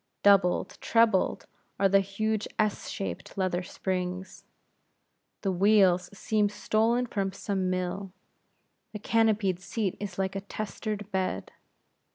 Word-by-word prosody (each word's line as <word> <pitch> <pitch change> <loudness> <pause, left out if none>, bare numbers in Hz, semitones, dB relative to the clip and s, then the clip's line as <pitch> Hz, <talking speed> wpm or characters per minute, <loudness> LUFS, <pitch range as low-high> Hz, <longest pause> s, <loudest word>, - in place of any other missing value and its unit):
Doubled, 195 -3 +4
trebled 225 -4 +2 0.3
are 195 - +5
the 195 +1 +5
huge 215 +2 -1
S 215 -1 0
shaped 95 - -5
leather 185 -2 0
springs; 185 0 -4 1.0
the 195 - 0
wheels 185 -2 +4
seem 215 -2 +1
stolen 225 +4 +1
from 200 -5 -2
some 190 -1 -2
mill; 185 +1 -2 0.8
the - - -3
canopied 210 -4 +2
seat 195 +1 -2
is 200 -3 -6
like 190 0 -1
a 195 - -2
testered 210 0 -5
bed. 185 - -2
195 Hz, 120 wpm, -28 LUFS, 185-215 Hz, 1.0 s, are